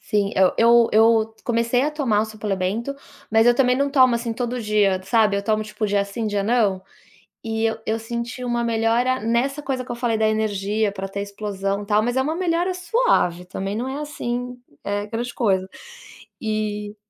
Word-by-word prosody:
Sim, 205 -1 0
eu 190 -1 +4
eu 235 0 +5
eu 225 0 +4
comecei 235 +1 +1
a 295 - +1
tomar 265 -9 +1
o 215 - +1
suplemento, 215 +3 -3 0.4
mas 225 +1 +4
eu 240 - +6
também 250 0 +3
não 280 +1 0
tomo, 260 -3 +5
assim, 235 0 -2
todo 245 +1 -3
dia 205 -3 +2
sabe, 210 0 +2
eu 200 - -2
tomo 215 0 +1
tipo 215 0 -3
dia 200 0 +1
sim 220 +3 -4
dia 205 -1 -1
não. 205 -4 +1 0.6
E 225 0 -1
eu 225 - 0
eu 220 - 0
senti 235 +3 -5
uma 240 -1 -1
melhora 235 +3 +1
nessa 245 +6 0
coisa 260 -3 -2
que - - -7
eu - - -3
falei 235 -2 0
da 220 - +2
energia 215 -1 0
para 195 -1 -5
ter 200 +1 -5
explosão, 200 0 -3
tal. 210 +1 +2
Mas 245 +3 -1
é - - +3
uma 305 +4 -1
melhora 350 +1 0
suave, 360 - +1
também 195 +2 -4
não 245 +3 -3
é 275 +3 -4
assim, 245 -4 -4 0.3
eh, 205 +1 -2
grande 235 +3 -4
coisa. 190 -5 +1 0.7
E 210 -1 -3
225 Hz, 195 wpm, -22 LUFS, 205-245 Hz, 0.7 s, eu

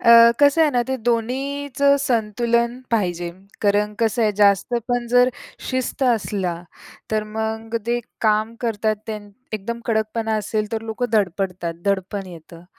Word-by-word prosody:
अ, 235 0 +8
कसं 285 +3 +5
आहे 305 - +4
ना, 245 -3 +2
ते 265 - 0
दोन्हीचं 275 +4 +1
संतुलन 235 -1 +1 0.2
पाहिजे, 175 -6 0 0.3
कारण 205 0 +2
कसं 230 +1 +2
आहे, 215 -1 +3
जास्तपण 235 +4 +2
जर 245 0 +6 0.4
शिस्त 260 +1 -2
असला, 205 -7 +1 0.6
तर 215 -1 +1
मग 220 +1 -3
ते 240 +1 +1 0.2
काम 215 +1 +2
करतात 220 -2 0
त्यां 215 -1 -4 0.3
एकदम 220 +3 -4
कडकपणा 220 0 0
असेल 215 0 -2
तर 225 -1 -2
लोकं 225 +1 -3
धडपडतात, 185 -4 0
दडपण 200 0 -1
येतं. 170 -1 -12
220 Hz, 135 wpm, -22 LUFS, 210-240 Hz, 0.6 s, अ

